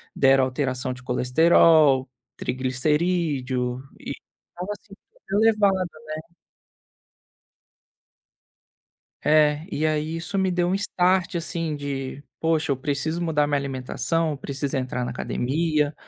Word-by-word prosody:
deram 135 0 +5
alteração 130 -1 -2
de 125 - -11
colesterol, 135 +2 +4 0.3
triglicerídeo 130 -1 0 0.2
e - - -5 0.4
tava 180 +4 -4
super 195 0 -16 0.4
elevado, 210 -2 +4 0.5
né. 165 +2 -14 2.8
É, 150 0 +3
e, 155 - -2
aí, 155 +1 -1
isso 195 +4 -3
me 190 -1 +2
deu 175 -1 +1
um 185 - +1
start, 185 -1 +1
assim, 165 -2 -2
de, 140 -1 -5 0.2
poxa 160 -3 +1
eu - - -1
preciso 145 +5 -2
mudar 155 -3 +1
minha 145 -1 +1
alimentação, 135 +4 -1
eu 145 - -4
preciso 140 0 -3
entrar 125 -1 -2
na - - -3
academia. 150 +2 0
150 Hz, 115 wpm, -24 LUFS, 130-170 Hz, 2.8 s, deram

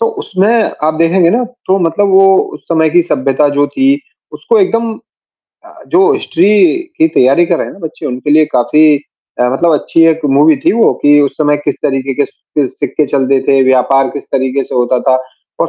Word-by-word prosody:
तो 460 - +1
उसमें 195 - -1 0.4
आप 155 - 0
देखेंगे 170 +1 +2
ना 240 +4 0 0.2
तो 190 +1 +1
मतलब 200 +5 0
वो 195 0 +4 0.2
उस - - -10
समय 160 -2 +1
की 175 +1 +3
सभ्यता 140 -2 0
जो 145 - +2
थी 270 0 +1 0.5
उसको 460 - -1
एकदम 230 - -1 0.7
अ, - - -17
जो 390 +4 +3
हिस्ट्री 205 - 0 0.5
की 320 0 +3
तैयारी 140 +7 +3
कर - - 0
रहे - - -3
हैं - - -10
ना - - -15
बच्चे 160 0 -7
उनके 130 +3 -4
लिए 155 +1 +4
काफ़ी 150 +6 +2 0.6
अ, 125 - +2
मतलब 165 +6 +1
अच्छी 165 +2 0
एक 160 0 -2 0.2
मूवी 150 +1 +4
थी - - +3
वो, 230 +1 +2
कि 145 0 +4
उस 140 -1 0
समय 145 -1 +1
किस 145 - -1
तरीके 135 0 -2
के 145 +2 0
सिक्क 140 -1 -5
सिक्के 150 - -2
चलते 135 -1 0
थे, 135 -1 +3
व्यापार 130 +1 +2
किस 145 - -8
तरीके 130 +1 -1
से - - -8
होता 125 0 0
था 130 - +4 0.4
और - - 0
150 Hz, 205 wpm, -12 LUFS, 135-190 Hz, 0.7 s, वो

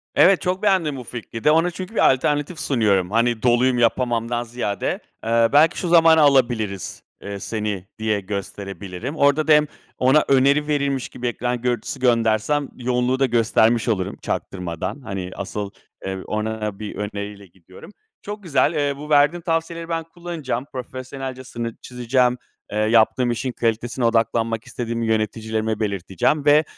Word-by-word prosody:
Evet, 190 0 +5
çok 185 +2 -2
beğendim 180 -9 +2
bu 125 - -7
fikri 115 -1 -8
de. 150 - +5
Ona 165 +3 +3
çünkü 185 +5 -8
bir - - +5
alternatif 145 +5 -1
sunuyorum. 100 -8 +1
Hani, 115 0 +1
"Doluyum, 125 +1 +3
yapamam."dan 120 0 +1
ziyade. 115 -4 -3 0.2
Eee, 115 0 +3
belki 155 +4 +5
"Şu 180 - -2
zamana 165 -1 +6
alabiliriz, 120 - +1 0.2
eee, 100 0 -6
seni." 105 -3 -4
diye 110 -1 0
gösterebilirim. 100 - -6
Orada 145 +1 +3
da - - +4
hem 150 0 +5 0.3
ona 135 +4 +4
öneri 140 +2 +3
verilmiş 140 -3 -1
gibi 125 - -5
ekran 120 0 -2
görüntüsü 125 +2 -2
göndersem 120 +3 +2
yoğunluğu 125 +1 0
da 135 - +4
göstermiş 115 -1 +2
olurum 95 -5 -1
çaktırmadan. 90 - -4
Hani, 95 -6 -5
asıl, 100 +1 -4 0.4
eee, 95 0 -3
ona 105 -1 -3
bir 105 -1 -6
öneriyle 100 0 -5
gidiyorum. 95 - -15 0.3
Çok 205 0 -7
güzel. 160 -1 +2
Eee, 145 -2 0
bu 150 +1 -9
verdiğin 150 +3 +4
tavsiyeleri 165 0 -2
ben 165 -1 -1
kullanacağım. 165 -7 -5
Profesyonelce 130 +1 -6
sınır 115 -2 -5
çizeceğim. 125 0 +1 0.3
Eee, 105 - -3
yaptığım 115 +3 +3
işin 125 +2 -2
kalitesine 115 +1 -1
odaklanmak 115 -1 +1
istediğimi 115 -1 -3
yöneticilerime 110 0 -1
belirteceğim 100 - 0
ve, 150 +1 +6
120 Hz, 150 wpm, -22 LUFS, 110-145 Hz, 0.4 s, zamana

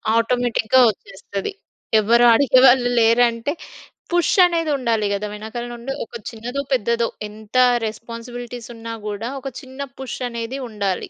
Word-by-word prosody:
ఆటోమేటిక్‌గా 240 +1 +2
వచ్చేస్తది. 195 - -6 0.5
ఎవరు 235 +3 +4
అడిగేవాళ్ళు 255 -1 +5
లేరంటే, 230 +2 +3 0.6
పుష్ 350 -2 +2
అనేది 335 -3 0
ఉండాలి 230 -5 0
కదా! 200 +1 -2
వెనకాల 220 +3 -6
నుండి 240 +3 -5
ఒక - - -32 0.2
చిన్నదో 245 +4 -5
పెద్దదో 235 -1 +1 0.2
ఎంత 215 +2 -14 0.3
రెస్‌పాన్స్‌బిలిటీస్ 235 +2 -8
ఉన్నా 230 0 -7
గూడా 210 +3 -4
ఒక 270 - -6
చిన్న 260 -1 -13 0.2
పుష్ 265 -1 -6
అనేది 235 +3 -5
ఉండాలి. 200 -4 -2
235 Hz, 125 wpm, -21 LUFS, 220-250 Hz, 0.6 s, అడిగేవాళ్ళు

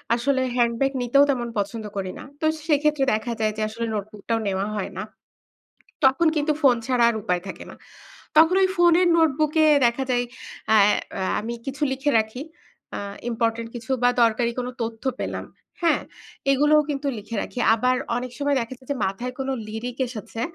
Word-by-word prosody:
আসলে 260 +2 +1
হ্যান্ডব্যাগ 240 +2 +2
নিতেও 275 +4 +4
তেমন 245 -3 0
পছন্দ 210 +2 -2
করি 190 -1 -3
না। - - -8 0.2
তো 315 - -2 0.2
সেক্ষেত্রে 300 -2 +2
দেখা 220 +2 -1
যায় 215 -1 +1
যে - - -2
আসলে 230 +2 -4
নোটবুক 210 0 -6
টাও 225 0 +2
নেওয়া 195 0 -1
হয় 200 -1 -3
না। 190 - -3 1.0
তখন 270 +6 +4
কিন্তু 300 +1 +1
ফোন 265 -4 +6
ছাড়া 250 -2 +2
আর 230 - -1
উপায় 180 -2 -1
থাকে 190 - -7
না। - - -11 0.6
তখন 325 +4 +6
ওই 375 - +4
ফোনের 350 +1 +5
নোটবুক 310 -2 +2
এ - - +5 0.2
দেখা 240 +3 0
যায় 245 0 +2 0.5
আ - - +7 0.4
অ্যা 190 - -2 0.2
আমি 235 +2 -4
কিছু 270 +2 -5
লিখে 275 +2 0
রাখি। 220 +4 -2 0.6
আ - - -3 0.3
ইম্পোর্টেন্ট 230 0 -1
কিছু 235 +2 -8
বা 245 - +6
দরকারি 235 +1 +2
কোনো 250 0 -2
তথ্য 225 -1 -5 0.2
পেলাম, - - -3 0.4
হ্যাঁ। 335 - +3 0.5
এগুলোও 295 +2 +4
কিন্তু 280 0 -3
লিখে 220 +2 -6
রাখি। - - -7 0.2
আবার 250 +3 +1 0.2
অনেক 250 +1 -4
সময় 285 -1 +1
দেখা 235 +3 -5
যায় 260 0 -21
যে 280 - 0
মাথায় 240 +6 -4
কোনো 270 0 -2 0.2
লিরিক 235 +3 -5
এসেছে। 230 -1 -7
245 Hz, 180 wpm, -24 LUFS, 225-280 Hz, 1.0 s, আ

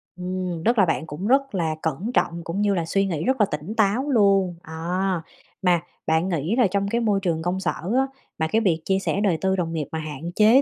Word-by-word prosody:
Ừm, 180 -2 -4
tức 235 +1 +3
là 195 - +6
bạn 160 -1 -1
cũng 160 +7 -4
rất 270 -1 +2
là 165 -4 0
cẩn 165 - -2
trọng 170 -5 0
cũng 170 +5 -3
như 205 -1 +3
là 170 -3 0
suy 195 +4 +1
nghĩ 165 -5 -2
rất 260 0 +1
là 210 - +6
tỉnh 150 +8 -4
táo 230 +6 +2
luôn. 195 -6 +3
À, 175 +3 -2 0.4
mà 180 -3 +3 0.3
bạn 160 +4 +2
nghĩ 170 +5 0
là 245 -5 +4
trong 200 0 0
cái 235 +3 0
môi 210 -3 +2
trường 165 -4 0
công 180 +3 -1
sở 180 - 0 0.2
á, 270 +1 +3 0.3
mà 160 - +1
cái 220 +7 +2
việc 170 -7 +1
chia 190 0 +2
sẻ 200 +1 -1
đời 180 -6 +2
tư 190 0 +2
đồng 170 -3 -2
nghiệp 150 -4 -2
mà 160 - -3
hạn 155 +2 -6
chế 220 +5 +6
185 Hz, 245 wpm, -24 LUFS, 165-205 Hz, 0.4 s, là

